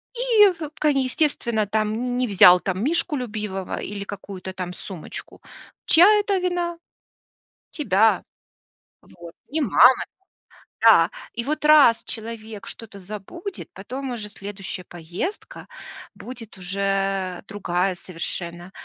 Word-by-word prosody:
и, 460 -5 +5
вполне 300 -4 -1
естественно, 255 -5 0
там, 215 +1 0
не 245 +3 -2 0.2
не - - -4
взял, 180 -3 +7
там, 190 +3 -3
мишку 315 +1 0
любимого 210 -6 -4
или 200 -1 -5
какую-то, 195 -2 -8
там, 180 -1 -5
сумочку. 180 -3 -9 0.4
Чья 345 +4 +7
это 405 -1 0
вина? 350 -1 -2 0.9
Тебя. 220 - +2 0.8
Вот. 170 -1 -13 0.2
И 310 +4 -2
мама. 250 0 +6 0.9
Да. - - +6 0.2
И 235 - -3
вот 300 +4 -3
раз 295 -7 +6
человек 220 -2 -7
что-то 210 -3 -10
забудет, 215 - -8
потом 255 +7 -6
уже 215 -3 -5
следующая 195 -2 -7
поездка 175 - -6 0.5
будет 230 -5 -10
уже 195 0 -1
другая 185 -2 -1
совершенно. 175 0 -6
215 Hz, 115 wpm, -23 LUFS, 190-280 Hz, 0.9 s, взял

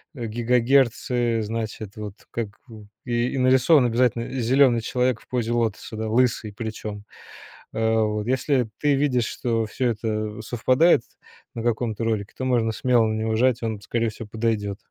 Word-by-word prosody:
э, 120 -4 -5
гигагерцы. 120 0 +2
Значит, 110 -2 -5
вот 105 -2 -6 0.2
как 115 -2 -2 0.2
в 110 -3 -12 0.2
и 120 0 0
и - - -2
нарисован 130 +2 +5
обязательно 120 0 +1
зелёный 130 -1 +3
человек 125 0 0
в - - -22
позе 120 -2 -2
лотоса, 115 -2 -2
да. 110 0 -3
Лысый, 115 -3 +1
причём, 105 -1 -6 0.7
э, 110 0 +1
вот. 105 0 -1
Если 130 -1 +1
ты 145 -1 +2
видишь, 135 -4 +1
что 115 -2 -1
всё 125 +3 -1
это 110 -1 -3
совпадает 130 +7 +3 0.5
на 115 - -4
каком-то 115 -1 -1
ролике, 105 -3 -2
то 130 - -3
можно 120 -3 +2
смело 120 0 +3
на 110 - -1
него 110 0 -1
жать, 120 +1 +2
он, 110 -3 -3
скорее 115 +2 -1
всего, 110 +1 -9
подойдёт. 110 -3 -1
115 Hz, 160 wpm, -24 LUFS, 110-125 Hz, 0.7 s, нарисован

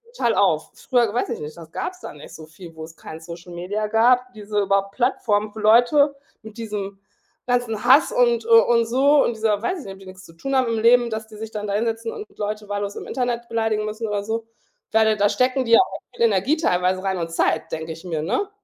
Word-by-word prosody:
total - - +1
auf. - - +1
Früher, 240 -5 0
weiß 245 - -1
ich 235 - -4
nicht 150 +1 -7
das 165 -2 -13
gab's 365 - -5
da - - -7
nicht 150 0 -13
so 160 - -10
viel, 165 +1 -13
wo 160 - -8
es 160 +1 -11
kein 160 - -9
Social 170 +1 -10
Media 195 +5 -3
gab, 250 +3 +3
diese 210 -1 -3
überhaupt 195 0 0
Plattform 215 -4 0
für 220 - -8
Leute 245 +7 +4 0.3
mit 220 0 -12
diesem 205 -3 -5 0.5
ganzen 245 -3 -1
Hass 270 +5 +6
und, 475 -2 +2
äh, - - -9
und 240 - +5
so 275 +4 +4
und 235 - -1
dieser 215 -2 0
weiß 365 +8 -2
ich - - -10
nicht, 195 - -7
ob 190 - -15
die 190 - -14
nichts 185 0 -12
zu 165 - -16
tun 270 +11 -4
haben 260 -2 +2
im 225 -1 -1
Leben, 240 +1 +4
dass 220 0 -4
die 215 -1 -13
sich 220 0 -7
dann 210 -1 -5
da 200 - -2
hinsetzen 225 +1 -2
und 425 - -7
Leute 210 0 -4
wahllos 205 0 -3
im - - -7
Internet 240 -2 -2
beleidigen 220 -2 -1
müssen 215 +1 -4
oder 205 -1 -2
so. 225 +1 -3 0.4
Ich - - -39
meine, 220 -1 +3
da 205 0 +3
stecken 255 +1 +1
die 230 - -3
ja - - +9
auch 380 - 0 0.2
viel 235 - +2
Energie 230 - +2
teilweise 185 - 0
rein 190 -1 -1
und 165 -1 -4
Zeit, 160 -1 0
denke 160 0 -5
ich 165 - -13
mir, 160 -3 -3
ne? 250 - -1
220 Hz, 245 wpm, -22 LUFS, 195-245 Hz, 0.5 s, ja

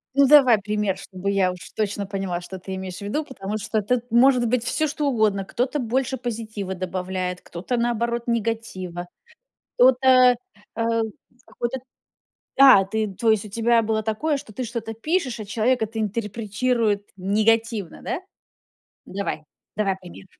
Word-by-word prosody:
Ну 280 0 +6
давай 260 -6 +7
пример, 210 -1 -1
чтобы 190 0 -5
я 190 -2 +2
уж 180 - -9 0.2
точно 205 -1 -1
поняла, 195 -3 -3
что 190 +1 -8
ты 190 +1 -6
имеешь 190 -1 -6
в - - -10
виду, 205 +10 -2
потому 210 -5 -5
что 215 +1 -1
тут 245 +3 -1
может 245 0 +5
быть 235 0 +1
всё 310 +6 0
что 290 0 -2
угодно. 210 -5 +1
Кто-то 255 +8 -1
больше 260 +2 -1
позитива 220 -5 -4
добавляет, 185 0 -3
кто-то, 185 +9 -4
наоборот, 235 0 0
негатива, 210 -6 -3 0.7
кто-то, 255 0 +6 0.4
а, 230 0 -1 0.7
какой-то 240 +2 -2 0.8
А, 260 -8 +9
ты 215 +2 -1
то 225 +2 +2
есть 215 -1 +1
у - - -9
тебя 230 +2 +3
было 220 0 -1
такое, 280 +8 0
что 215 - -11
ты 255 - -4
что-то 225 -1 -5
пишешь, 265 +1 -1
а 215 - -5
человек 230 +3 +1
это 220 +1 -2
интерпретирует 215 0 -1
негативно, 215 +1 +1
да? - - -2 0.9
Давай, 195 -5 -4 0.3
давай 195 -2 0
пример. 185 +1 -12
220 Hz, 155 wpm, -23 LUFS, 195-240 Hz, 0.9 s, А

